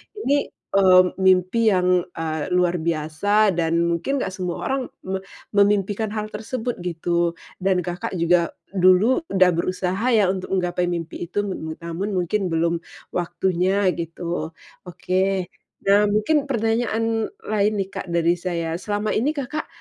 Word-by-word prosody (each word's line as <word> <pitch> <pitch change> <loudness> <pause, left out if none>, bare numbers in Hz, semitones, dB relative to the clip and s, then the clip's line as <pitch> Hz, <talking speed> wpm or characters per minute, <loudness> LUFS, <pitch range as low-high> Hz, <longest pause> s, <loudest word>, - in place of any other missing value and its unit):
ini, 285 -9 0 0.2
eee, 185 -2 +6 0.2
mimpi 190 +4 +3
yang, 180 -1 +2
eee, 160 -2 -3
luar 180 -1 +2
biasa 170 +6 +1
dan 170 -1 +1
mungkin 170 +11 0
gak - - -3
semua 180 -2 -4
orang 270 0 0 0.2
me 190 0 -3 0.3
memimpikan 205 +1 +2
hal 215 0 -3
tersebut 225 +1 -4
gitu. 170 0 -1 0.2
Dan 185 -1 +1
Kakak 175 +2 -4
juga 170 0 +3 0.2
dulu 185 - +4
udah 185 -2 +4
berusaha 185 +5 -1
ya 195 -4 +4
untuk 190 0 -3
menggapai 180 -1 0
mimpi 170 0 -4
itu, 205 +3 -1 0.4
namun 185 +4 -3
mungkin 185 +2 0
belum 165 0 0 0.3
waktunya 180 +2 +1
gitu, 170 -1 -4 0.3
oke. 185 +1 -1 0.3
Nah 205 +1 +4
mungkin 275 +8 +1
pertanyaan 225 -2 0 0.2
lain 210 0 +1
nih 195 -1 -2
Kak - - -6
dari 170 0 +1
saya, 170 -2 -2
selama 210 +1 -2
ini 290 +8 0
Kakak 290 +3 -4
185 Hz, 135 wpm, -22 LUFS, 175-210 Hz, 0.4 s, eee